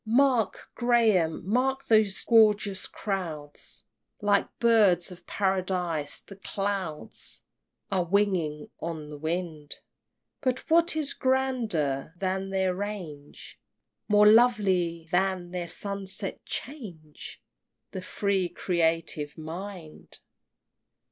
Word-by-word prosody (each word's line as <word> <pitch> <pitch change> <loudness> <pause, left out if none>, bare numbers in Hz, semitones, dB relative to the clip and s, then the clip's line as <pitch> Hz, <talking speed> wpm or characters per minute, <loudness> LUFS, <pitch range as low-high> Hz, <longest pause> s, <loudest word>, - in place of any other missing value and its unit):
XXXI. 225 +2 0
Mark, 260 -7 +2
Graham, 220 -10 +2
mark 265 +5 +1
those 215 -3 +3
gorgeous 210 -4 +4
crowds! 165 -8 -4 0.4
Like 205 -1 +2
Birds 205 -7 +4
of 175 -1 -13
Paradise 180 -6 -1
the 195 - -13
clouds 195 -5 -3 0.5
Are 185 -2 +2
winging 175 -5 0
on 160 -2 -5
the 150 - -7
wind! 160 -2 -3 0.7
But 255 -1 -1
what 335 0 +4
is 305 -3 -1
grander 220 - 0
than 190 +1 -2
their 190 -1 +1
range? 180 -8 -7 0.5
More 210 0 +5
lovely 195 -8 +4
than 185 -1 0
their 180 -1 -3
sunset 195 +2 -4
change? 180 - -7 0.5
The 185 - -5
free 190 -1 0
creative 165 -4 -1
mind! 165 +1 -8
190 Hz, 100 wpm, -27 LUFS, 165-210 Hz, 0.7 s, More